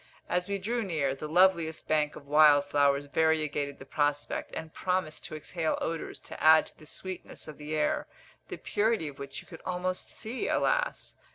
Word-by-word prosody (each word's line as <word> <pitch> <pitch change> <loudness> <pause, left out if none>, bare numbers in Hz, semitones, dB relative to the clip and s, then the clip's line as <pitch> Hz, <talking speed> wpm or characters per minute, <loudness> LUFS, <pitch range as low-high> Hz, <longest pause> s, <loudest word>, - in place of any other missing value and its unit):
As 180 +2 -1
we 200 - 0
drew 230 +5 -1
near, 155 -9 0
the 140 +3 -6
loveliest 170 -1 +3
banks 150 -1 +1
of 140 - -12
wild 145 0 +6
flowers 145 0 +2
variegated 150 -2 +1
the 135 - -11
prospect, 145 0 -1
and 160 0 -6
promised 180 -4 -2
to - - -6
exhale 160 +1 -2
odours 165 -1 -3
to - - -9
add 155 0 +7
to - - -13
the 155 - -14
sweetness 185 +1 -7
of 155 -1 -9
the 150 +1 -4
air, 150 - 0 0.4
the - - -6
purity 210 -7 0
of 140 - -13
which 140 0 -6
you - - -24
could - - -11
almost 185 0 -2
see, 235 +3 -4
alas! - - 0
155 Hz, 185 wpm, -29 LUFS, 145-185 Hz, 0.4 s, add